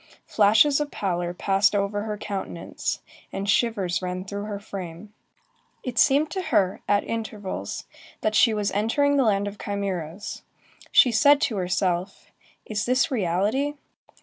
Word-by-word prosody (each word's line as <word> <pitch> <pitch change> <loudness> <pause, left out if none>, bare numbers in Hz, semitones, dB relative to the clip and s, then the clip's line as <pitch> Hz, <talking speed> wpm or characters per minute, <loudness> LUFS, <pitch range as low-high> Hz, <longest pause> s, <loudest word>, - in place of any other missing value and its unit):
Flashes 220 +8 +4
of 295 -1 -2
pallor 175 -6 -2
passed 195 +3 +2
over 205 +1 0
her 210 -1 -3
countenance, 195 -4 -4 0.3
and 195 +1 -4
shivers 200 -5 +1
ran 180 0 -4
through 200 +1 -5
her 205 -1 -5
frame. 195 0 -8 0.7
It 250 -2 -2
seemed 290 +2 +4
to 380 - -2
her, 200 - +1
at 205 0 +3
intervals, 210 - -5 0.4
that 215 - 0
she 225 +2 +5
was 210 -2 -1
entering 235 +8 +2
the 270 - +4
land 205 -2 +2
of 205 0 -7
chimæras; 195 -2 -4 0.5
she 250 - +6
said 285 +6 +5
to 230 -9 0
herself: 185 0 -1 0.3
"Is 210 0 -2
this 255 +1 +2
reality?" 220 +7 0
205 Hz, 145 wpm, -25 LUFS, 190-230 Hz, 0.7 s, she